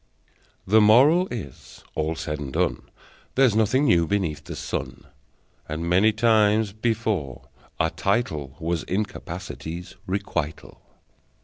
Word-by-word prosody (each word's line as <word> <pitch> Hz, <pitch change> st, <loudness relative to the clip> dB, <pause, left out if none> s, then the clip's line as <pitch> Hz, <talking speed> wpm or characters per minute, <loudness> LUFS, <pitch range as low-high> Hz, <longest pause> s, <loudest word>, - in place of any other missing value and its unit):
The 110 Hz, +3 st, +5 dB
Moral 140 Hz, -, +6 dB
is: 90 Hz, -, -9 dB
All 80 Hz, +1 st, -1 dB
said 75 Hz, -2 st, -4 dB
and 70 Hz, -3 st, -5 dB
done, -, -, -1 dB, 0.5 s
There's 130 Hz, -5 st, +4 dB
nothing 110 Hz, +6 st, +3 dB
new 85 Hz, -, +4 dB
beneath 80 Hz, -7 st, -1 dB
the -, -, -6 dB
sun, -, -, -5 dB, 0.7 s
And 80 Hz, +2 st, -3 dB
many 95 Hz, +5 st, +4 dB
times 110 Hz, -2 st, +3 dB
before, 110 Hz, -, -2 dB, 0.3 s
a 80 Hz, -, +2 dB
title 80 Hz, -, -1 dB
Was 85 Hz, 0 st, -1 dB
incapacity's 90 Hz, -3 st, -5 dB
requital! 85 Hz, -5 st, -4 dB
95 Hz, 115 wpm, -24 LUFS, 80-110 Hz, 0.7 s, Moral